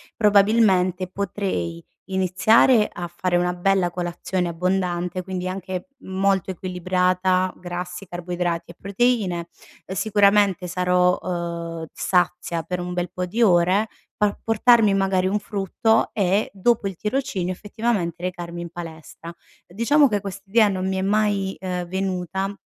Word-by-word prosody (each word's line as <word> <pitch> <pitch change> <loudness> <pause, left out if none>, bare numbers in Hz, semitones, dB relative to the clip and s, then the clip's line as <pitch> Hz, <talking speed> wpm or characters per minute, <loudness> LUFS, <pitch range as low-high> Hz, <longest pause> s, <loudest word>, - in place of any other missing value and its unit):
probabilmente 200 -3 +3
potrei 185 - -3 0.3
iniziare 210 +5 +4
a 175 0 -5
fare 175 +1 -1
una 180 0 +1
bella 180 0 +1
colazione 175 +1 -2
abbondante, 180 +1 -1
quindi 185 0 -4
anche 185 +2 -5
molto 190 0 0
equilibrata: 185 0 0
grassi, 180 +1 -6
carboidrati 175 -1 -3
e - - -16
proteine; 200 -4 0 0.4
uhm, 190 - -5
sicuramente 200 -2 +3
sarò, 180 0 +2
uhm, 170 -2 -4
sazia 175 -2 0
per 180 +1 -4
un 180 0 -4
bel 180 0 -2
po' 180 - -3
di 215 +7 -3
ore, 185 +2 +3 0.3
pa 210 -1 +1
portarmi 225 -1 +4
magari 190 -1 +1
un 200 +2 +1
frutto 210 +2 0
e, 200 0 +1
dopo 205 +2 +1
il 195 - -5
tirocinio 205 -4 -2
effettivamente 200 -4 -2
recarmi 175 -1 -5
in 170 - -6
palestra. 165 -1 -9 0.4
Diciamo 255 - +3
che 205 -2 0
questa 195 0 -7
idea 220 +1 +5
non 190 -2 -2
mi 190 0 -1
è - - -1
mai, 200 -1 +1
uhm, 180 -1 -3
venuta 190 +1 -2
185 Hz, 135 wpm, -23 LUFS, 175-200 Hz, 0.4 s, idea